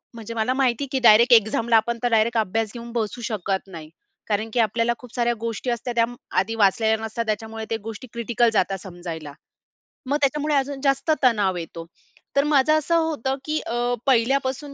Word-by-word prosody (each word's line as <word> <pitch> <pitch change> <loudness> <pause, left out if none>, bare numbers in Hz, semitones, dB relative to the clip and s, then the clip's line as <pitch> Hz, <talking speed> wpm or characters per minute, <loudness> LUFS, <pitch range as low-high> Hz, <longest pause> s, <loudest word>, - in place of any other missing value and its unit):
म्हणजे 230 0 -8
मला 230 +3 0
माहिती, 260 0 +1
की 265 - +1
डायरेक्ट 235 +4 +6
एक्झामला 225 +1 +4
आपण 235 +2 +1
तर 245 - +2
डायरेक्ट 225 +1 +2
अभ्यास 220 +1 0
घेऊन 235 0 -8
बसू 230 0 -3
शकत 195 -2 -2
नाही. 155 -1 -10 0.4
कारण, 215 +1 -1
की 245 - -1
आपल्याला 230 +2 +1
खूप 250 -2 -14
साऱ्या 240 -1 +1
गोष्टी 230 +2 -3
असतात. 240 +1 -3
त्या 230 -1 +3 0.3
आधी 195 +5 +1
वाचलेल्या 220 +1 +3
नसतात. 220 +1 -3
त्याच्यामुळे 220 +1 -3
त्या 225 - -1
गोष्टी 225 +3 -7
क्रिटिकल 235 0 +1
जातात 195 -2 +1
समजायला. 170 -5 -8 0.7
मग 285 +3 0
त्याच्यामुळे 295 +2 +1
अजून 275 0 -1
जास्त 275 +2 +1
तणाव 205 -7 +3
येतो. 165 0 -7 0.5
तर 280 - +4
माझं 295 0 +3
असं 310 +2 0
होतं, 295 -5 -1
की 310 0 -1
अ, 240 +1 -1
पहिल्यापासून 265 +2 +1
230 Hz, 180 wpm, -23 LUFS, 215-260 Hz, 0.7 s, डायरेक्ट